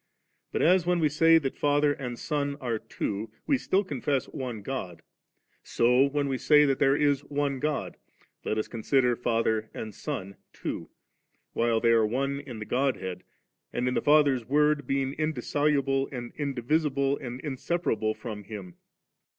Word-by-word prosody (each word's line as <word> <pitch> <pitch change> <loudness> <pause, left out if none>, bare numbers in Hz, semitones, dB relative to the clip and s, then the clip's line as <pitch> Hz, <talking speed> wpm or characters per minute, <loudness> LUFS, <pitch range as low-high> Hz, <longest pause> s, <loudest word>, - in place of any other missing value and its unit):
but, - - 0
as 180 +2 +5
when 175 +1 +1
we 155 - +3
say 165 +2 +5
that 135 -4 -1
Father 145 0 +3
and 125 -4 -6
Son 145 0 -2
are 120 -5 -2
two, 110 -1 -4 0.2
we 285 - +3
still 200 -6 +1
confess 140 -5 -1
one 120 -6 -5
God, 95 -9 -5 0.6
so 125 +3 +3
when 140 0 -1
we 135 -2 -2
say 150 -1 +5
that 135 -2 +1
there 135 -1 +4
is 145 -2 +2
one 140 -2 -1
God, 150 +1 -2 0.5
let 110 - -1
us 110 - -1
consider 125 +1 +1
Father 115 -2 0
and 110 -1 -6
Son 95 0 -5 0.2
two, - - -5 0.6
while 115 -1 +2
they 115 0 +3
are 115 -1 +5
one 135 +5 -1
in 135 -5 -8
the 110 - -6
Godhead, 105 -9 -1 0.5
and 125 +1 -1
in 125 - +1
the - - +1
Father's 145 -4 +4
Word 150 +1 +2
being 135 0 0
indissoluble 145 -2 +1
and 120 -3 -6
indivisible 140 0 0
and 125 -1 -6
inseparable 130 -6 -1
horn 105 -4 -7
Hiin. 100 -5 -8
135 Hz, 160 wpm, -28 LUFS, 115-145 Hz, 0.6 s, as